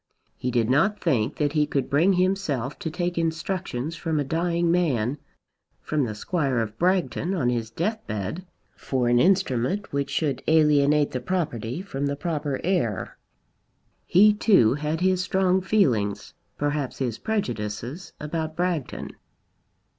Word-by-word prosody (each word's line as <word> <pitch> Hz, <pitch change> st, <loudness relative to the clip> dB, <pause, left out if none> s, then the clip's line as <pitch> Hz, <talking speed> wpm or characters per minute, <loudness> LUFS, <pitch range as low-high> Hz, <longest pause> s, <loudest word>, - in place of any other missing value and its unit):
He 125 Hz, -, -3 dB
did 120 Hz, -3 st, +1 dB
not 165 Hz, -, +2 dB
think 130 Hz, -6 st, 0 dB
that 145 Hz, -1 st, 0 dB
he 150 Hz, -2 st, +2 dB
could 140 Hz, -2 st, -1 dB
bring 165 Hz, +8 st, +3 dB
himself 180 Hz, -9 st, 0 dB
to 160 Hz, -, -3 dB
take 175 Hz, +1 st, -2 dB
instructions 165 Hz, -3 st, -2 dB
from 160 Hz, -1 st, -1 dB
a -, -, +1 dB
dying 170 Hz, +3 st, 0 dB
man, 145 Hz, -7 st, +1 dB, 0.6 s
from 150 Hz, -3 st, -1 dB
the 110 Hz, -3 st, -4 dB
Squire 140 Hz, -, -1 dB
of 110 Hz, -1 st, -3 dB
Bragton 185 Hz, 0 st, +1 dB
on 125 Hz, -9 st, +1 dB
his 115 Hz, -2 st, -1 dB
death 195 Hz, -, -2 dB
bed, 105 Hz, -, -4 dB, 0.3 s
for 125 Hz, -3 st, -1 dB
an 120 Hz, 0 st, +4 dB
instrument 185 Hz, -, +1 dB
which 140 Hz, 0 st, -1 dB
should 150 Hz, -4 st, -1 dB
alienate 150 Hz, -2 st, +4 dB
the 125 Hz, -, -2 dB
property 145 Hz, -, -2 dB
from 140 Hz, -7 st, -3 dB
the 140 Hz, -, -1 dB
proper 145 Hz, -2 st, -2 dB
heir. 160 Hz, -, -1 dB, 0.9 s
He 210 Hz, +4 st, +6 dB
too 195 Hz, -, +4 dB
had 150 Hz, +3 st, -2 dB
his 185 Hz, 0 st, +2 dB
strong 190 Hz, 0 st, +2 dB
feelings, 125 Hz, -, +1 dB, 0.2 s
perhaps 145 Hz, -2 st, -2 dB
his 120 Hz, -4 st, -2 dB
prejudices, 125 Hz, -, -3 dB
about 155 Hz, +1 st, -3 dB
Bragton. 175 Hz, -5 st, -2 dB
150 Hz, 145 wpm, -25 LUFS, 125-180 Hz, 0.9 s, He